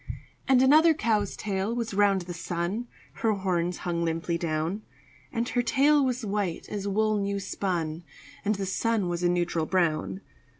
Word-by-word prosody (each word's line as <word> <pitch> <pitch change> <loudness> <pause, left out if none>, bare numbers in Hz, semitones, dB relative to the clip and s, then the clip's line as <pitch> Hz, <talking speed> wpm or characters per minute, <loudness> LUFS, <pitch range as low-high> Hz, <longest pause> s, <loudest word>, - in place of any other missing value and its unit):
And 260 -1 +5
another 310 +4 +6
cow's 215 -8 0
tail 200 +2 -2
was 230 -3 -3
round 200 -1 +3
the 175 0 -6
sun 175 +7 -3 0.3
(Her 220 -1 +1
horns 180 -3 -1
hung 170 -1 0
limply 165 +1 -1
down); 165 +4 -2 0.5
And 235 0 -1
her 245 - +1
tail 285 +4 +4
was 250 -2 -1
white 200 -4 -2
as 205 -1 -4
wool 215 +1 +1
new 200 0 -1
spun, 175 -4 -2 0.4
And 210 0 +1
the 195 0 -3
sun 205 0 0
was 175 0 -2
a 175 - +3
neutral 175 -2 0
brown. 155 - 0
195 Hz, 165 wpm, -27 LUFS, 175-225 Hz, 0.5 s, another